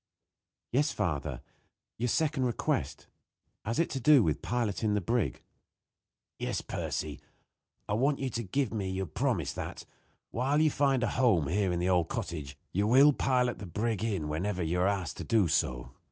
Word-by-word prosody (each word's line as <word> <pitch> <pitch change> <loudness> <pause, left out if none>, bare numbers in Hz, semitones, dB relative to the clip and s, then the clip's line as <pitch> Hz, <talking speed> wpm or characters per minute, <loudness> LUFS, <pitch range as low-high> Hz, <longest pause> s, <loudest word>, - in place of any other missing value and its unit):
"Yes, 145 +4 +2
father 75 - -2 0.6
your 120 - +1
second 145 +1 +1
request. 120 - -1 0.6
Has 115 +4 -2
it 165 - +2
to 135 - -2
do 145 -1 +6
with 80 -5 0
piloting 110 -1 0
the - - +2
brig?" 115 +2 -1 1.0
"Yes, - - -2
Percy. - - -4 0.7
I - - -1
want 135 +6 +2
you 135 -2 -3
to 115 - -2
give 115 +3 -1
me 100 -4 -2
your 95 +1 -2
promise - - -1
that, - - -6 0.5
while 135 +5 +1
you 155 -1 +4
find 135 -3 +2
a - - +2
home 100 - +3
here 95 +1 +1
in 90 - 0
the 90 +2 0
old 90 -3 +2
cottage, 70 -5 -5
you 100 +3 +1
will 135 +5 +7
pilot 125 -4 +1
the 100 - -7
brig 110 +3 -1
in 100 -9 -1
whenever 90 +5 -2
you 85 +2 0
are 90 - +3
asked 95 -5 -2
to - - -5
do 110 -6 +3
so. 65 -5 0
105 Hz, 175 wpm, -30 LUFS, 90-130 Hz, 1.0 s, will